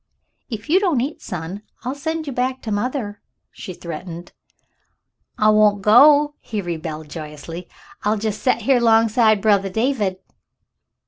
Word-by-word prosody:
"If 220 Hz, -3 st, -6 dB
you 355 Hz, +5 st, +4 dB
don't 355 Hz, -10 st, +1 dB
eat, 275 Hz, +5 st, -3 dB
son, 180 Hz, +3 st, -6 dB, 0.2 s
I'll 255 Hz, +2 st, -2 dB
send 320 Hz, +3 st, -3 dB
you 280 Hz, -, -5 dB
back 255 Hz, +1 st, -2 dB
to 220 Hz, -, -4 dB
mother," 210 Hz, -1 st, -3 dB, 0.3 s
she -, -, -8 dB
threatened. 170 Hz, 0 st, -8 dB, 1.1 s
"I 215 Hz, -, +4 dB
won't 210 Hz, -2 st, +4 dB
go," 290 Hz, +7 st, +6 dB
he 215 Hz, -, -5 dB
rebelled 160 Hz, -4 st, -5 dB
joyously. 155 Hz, +3 st, -8 dB, 0.3 s
"I'll 210 Hz, +1 st, +1 dB
jes' 215 Hz, 0 st, -3 dB
set 235 Hz, -3 st, +1 dB
here 260 Hz, +2 st, +3 dB
'longside 225 Hz, -2 st, +3 dB
brothah 200 Hz, -3 st, +3 dB
David." 220 Hz, -4 st, 0 dB
215 Hz, 140 wpm, -21 LUFS, 185-255 Hz, 1.1 s, go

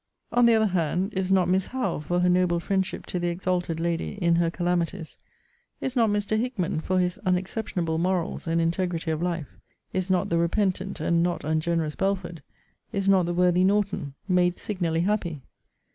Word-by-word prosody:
On 240 Hz, 0 st, +5 dB
the 230 Hz, -, +6 dB
other 220 Hz, 0 st, +3 dB
hand, 185 Hz, +1 st, 0 dB
is 190 Hz, -1 st, -1 dB
not 190 Hz, -2 st, +4 dB
Miss 185 Hz, +1 st, +1 dB
HOWE, 260 Hz, -, -2 dB
for 175 Hz, +4 st, -1 dB
her 180 Hz, -, +3 dB
noble 180 Hz, -1 st, +3 dB
friendship 190 Hz, +1 st, -2 dB
to 180 Hz, -, -3 dB
the 175 Hz, -, -1 dB
exalted 175 Hz, -1 st, -1 dB
lady 170 Hz, 0 st, -1 dB
in 170 Hz, -4 st, +2 dB
her 170 Hz, -1 st, +2 dB
calamities 175 Hz, -1 st, -2 dB, 0.6 s
is 265 Hz, 0 st, -3 dB
not 230 Hz, -3 st, +4 dB
Mr. 205 Hz, +1 st, 0 dB
HICKMAN, 225 Hz, -10 st, -1 dB
for 185 Hz, +3 st, 0 dB
his 180 Hz, -1 st, 0 dB
unexceptionable 180 Hz, -3 st, -1 dB
morals, 180 Hz, -1 st, -1 dB
and 165 Hz, +1 st, +1 dB
integrity 165 Hz, 0 st, -1 dB
of 155 Hz, 0 st, -2 dB
life 170 Hz, -4 st, -3 dB, 0.3 s
is 185 Hz, 0 st, -1 dB
not 185 Hz, -2 st, +1 dB
the 170 Hz, -, +2 dB
repentant 190 Hz, +2 st, 0 dB
and 170 Hz, 0 st, +2 dB
not 175 Hz, 0 st, -1 dB
ungenerous 155 Hz, 0 st, 0 dB
BELFORD 190 Hz, -4 st, -2 dB, 0.5 s
is 195 Hz, -1 st, -2 dB
not 190 Hz, -3 st, +4 dB
the 175 Hz, -, -1 dB
worthy 180 Hz, 0 st, +3 dB
NORTON 195 Hz, -8 st, 0 dB
made 180 Hz, -2 st, +3 dB
signally 170 Hz, -6 st, -1 dB
happy? 170 Hz, -7 st, -1 dB
180 Hz, 175 wpm, -26 LUFS, 170-190 Hz, 0.6 s, the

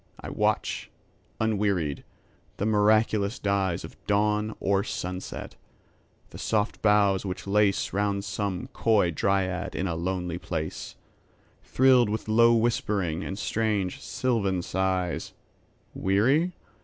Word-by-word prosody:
I -, -, -7 dB
watch, -, -, -1 dB, 0.5 s
unwearied, 100 Hz, -9 st, 0 dB, 0.5 s
the 100 Hz, -, -1 dB
miraculous 110 Hz, +1 st, +2 dB
dyesOf 100 Hz, -3 st, -1 dB
dawn 105 Hz, +1 st, +1 dB
or 100 Hz, 0 st, +1 dB
sunset; 90 Hz, 0 st, -5 dB, 0.8 s
the -, -, -10 dB
soft 105 Hz, -1 st, -1 dB
boughs 105 Hz, -2 st, +3 dB
which 95 Hz, -2 st, -5 dB
laceRound 100 Hz, 0 st, +1 dB
some 100 Hz, -2 st, -3 dB
coy 105 Hz, -6 st, +2 dB
dryad 95 Hz, +2 st, -1 dB
in 95 Hz, -, -1 dB
a 90 Hz, -, -1 dB
lonely 90 Hz, 0 st, -3 dB
place, 80 Hz, -3 st, -5 dB, 0.7 s
Thrilled 130 Hz, -3 st, +4 dB
with 110 Hz, +1 st, -3 dB
low 115 Hz, +2 st, +5 dB
whispering 100 Hz, -7 st, 0 dB
and 95 Hz, -, -5 dB
strange 105 Hz, -4 st, -1 dB
sylvan 100 Hz, -8 st, -1 dB
sighs:Weary? 95 Hz, -, -1 dB
100 Hz, 105 wpm, -27 LUFS, 95-110 Hz, 0.8 s, low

